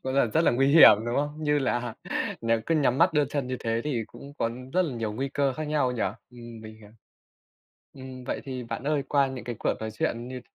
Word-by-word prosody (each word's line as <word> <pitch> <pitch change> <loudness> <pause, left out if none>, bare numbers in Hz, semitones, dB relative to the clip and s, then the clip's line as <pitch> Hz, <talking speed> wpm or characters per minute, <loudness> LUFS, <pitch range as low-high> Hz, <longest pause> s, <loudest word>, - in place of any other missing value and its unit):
Cũng 130 0 -3
là 140 - +4
rất 115 +8 +1
là - - +5
nguy 135 +3 +2
hiểm, 145 -7 +9
đúng 120 - -1
không? 145 +1 -1
Như 150 -1 +2
là 120 -4 -1 0.5
nếu 115 -1 +1
cứ 165 - +2
nhắm 135 -4 +2
mắt 170 +1 +4
đưa 150 -2 +3
chân 140 -1 -3
như 130 0 -3
thế 115 0 0
thì 125 -7 -1
cũng 140 - -12
có 115 - 0 0.2
rất 185 - +3
là 155 -8 -3
nhiều 115 -2 -3
nguy 135 +5 -3
cơ 140 0 0
khác 155 +4 -5
nhau 150 -4 +1
nhỉ. 120 - -2 0.3
Ừm, 120 -2 -11
mình 110 0 -10
hiểu. 105 -1 -15 1.0
Ừm, 130 -1 -10
vậy - - -3
thì 130 -2 -5
bạn 115 - -5
ơi, 145 -1 +1
qua 140 -1 +3
những 130 -2 -7
cái 120 -1 -5
cuộc - - 0
nói 110 0 -4
chuyện 115 +2 -3
như 130 0 -6
130 Hz, 250 wpm, -27 LUFS, 120-145 Hz, 1.0 s, hiểm